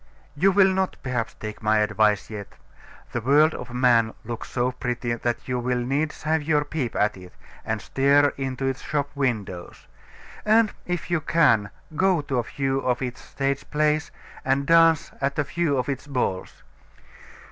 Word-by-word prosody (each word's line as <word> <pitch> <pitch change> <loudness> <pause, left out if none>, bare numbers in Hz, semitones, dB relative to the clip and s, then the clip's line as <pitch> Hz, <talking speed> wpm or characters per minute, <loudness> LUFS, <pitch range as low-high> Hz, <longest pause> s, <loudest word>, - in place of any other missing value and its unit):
You 190 +7 +4
will 190 0 +5
not, 190 0 -1
perhaps, 125 -3 -2
take 105 0 -7
my 110 0 +3
advice 105 0 +2
yet. 105 -2 -6 0.6
The 120 - -2
world 150 +6 +4
of 125 - -7
man 120 -3 +3
looks 120 -1 -6
so 125 0 0
pretty, 125 -1 -3
that 120 0 -3
you 125 -1 -1
will 125 +1 0
needs 140 +5 -2
have 160 +1 +1
your 150 -1 +1
peep 145 -6 -3
at 105 0 +1
it, 90 -1 -13 0.3
and - - -2
stare 140 +1 +3
into 135 -1 -3
its 135 0 -2
shop 145 -1 -2
windows; 110 -11 -3 0.6
and 215 0 +4
if 175 0 -3
you 170 -2 +1
can, 145 -11 +3 0.3
go 185 -1 +3
to 135 -3 -2
a - - 0
few 135 +2 -1
of 125 -1 -1
its 125 -1 -5
stage 140 0 -3
plays, 150 +1 +1 0.3
and 135 +1 +1
dance 165 0 +4
at 140 0 -1
a 150 - +2
few 165 -1 0
of 125 - -1
its 140 0 -4
balls. 125 -9 -3
135 Hz, 170 wpm, -24 LUFS, 120-150 Hz, 0.6 s, will